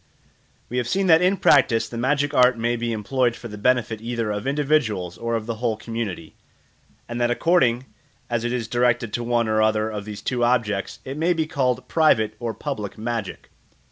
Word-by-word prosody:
We 125 - -4
have 125 -2 0
seen 195 +5 +1
that 165 -2 +6
in 185 +2 +3
practice 125 -9 +4
the - - -9
magic 140 +4 0
art 125 -2 +5
may 120 +1 0
be 120 0 -2
employed 120 +3 0
for 120 - -9
the 105 - -8
benefit 115 -2 +1
either 115 -2 -2
of 105 +4 -4
individuals 135 - 0
or 115 0 -2
of 110 -1 -3
the 115 -1 -4
whole 115 -2 -1
community, 110 -8 -5 0.7
and 120 0 -4
that 120 - +2
according 125 -3 +2 0.4
as 120 -1 -1
it 120 - -1
is 120 -3 -2
directed 120 -1 +1
to 120 - -2
one 120 -1 +1
or 110 0 +2
other 110 0 +1
of 105 -1 -5
these 105 -1 -8
two 125 -2 -1
objects 115 -5 0
it 135 +3 -6
may 170 +2 +2
be 160 -2 -1
called 130 -4 -1
private 110 -10 +3
or 115 -2 -3
public 110 -9 -5
magic. 115 -2 -5
120 Hz, 200 wpm, -23 LUFS, 110-130 Hz, 0.7 s, that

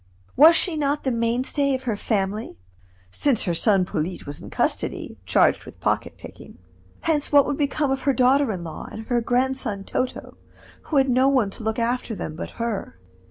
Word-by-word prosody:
Was 315 +5 +8
she 350 -2 +1
not 290 0 0
the 265 - 0
mainstay 250 +4 0
of 260 - -6
her 235 -4 -1
family 205 - -2 0.5
(since 265 - +1
her 175 - -1
son 195 +1 +2
Polyte 175 +2 -4
was 145 0 -8
in - - -9
custody, - - -2
charged - - +3
with - - -13
pocket - - -1
picking), - - -12 0.4
hence 305 -3 0
what 285 -1 +6
would 285 - -2
become 290 -1 0
of 270 0 -1
her 275 +1 +2
daughter 260 +1 +3
in 180 -4 -5
law, 165 - -7
and 220 - -7
of 225 - -13
her 240 -1 +2
grandson 245 -4 0
Toto, 255 +5 -4 0.5
who 300 - -1
had 270 0 +4
no 260 +2 +4
one 250 -8 +2
to - - -9
look 220 0 -2
after 235 -1 -1
them 155 - -5
but 160 - -6
her? 230 - -3
245 Hz, 195 wpm, -23 LUFS, 215-275 Hz, 0.5 s, Was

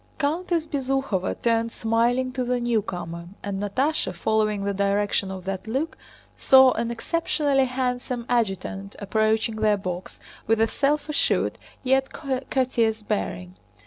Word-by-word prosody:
Countess 330 +2 0
Bezúkhova 270 - -1
turned 230 -1 +2
smiling 235 +4 +1
to 255 0 -2
the 250 0 0
newcomer, 185 -8 -2 0.2
and 200 -1 -3
Natásha, 230 - 0
following 215 +1 +1
the 200 0 0
direction 200 0 +1
of 190 -1 -7
that 195 +2 -4
look, 270 +8 -2 0.4
saw 265 -1 +7
an 230 0 -1
exceptionally 280 +2 +1
handsome 250 -1 -2
adjutant 200 -4 -1
approaching 220 +2 +1
their 215 -1 +3
box 185 -2 -6 0.3
with 225 0 +3
a 225 - +4
self 290 +4 0
assured 300 0 +1 0.2
yet 265 +1 +2 0.4
courteous 230 -4 +1
bearing. 180 -4 -3
230 Hz, 130 wpm, -25 LUFS, 200-265 Hz, 0.4 s, saw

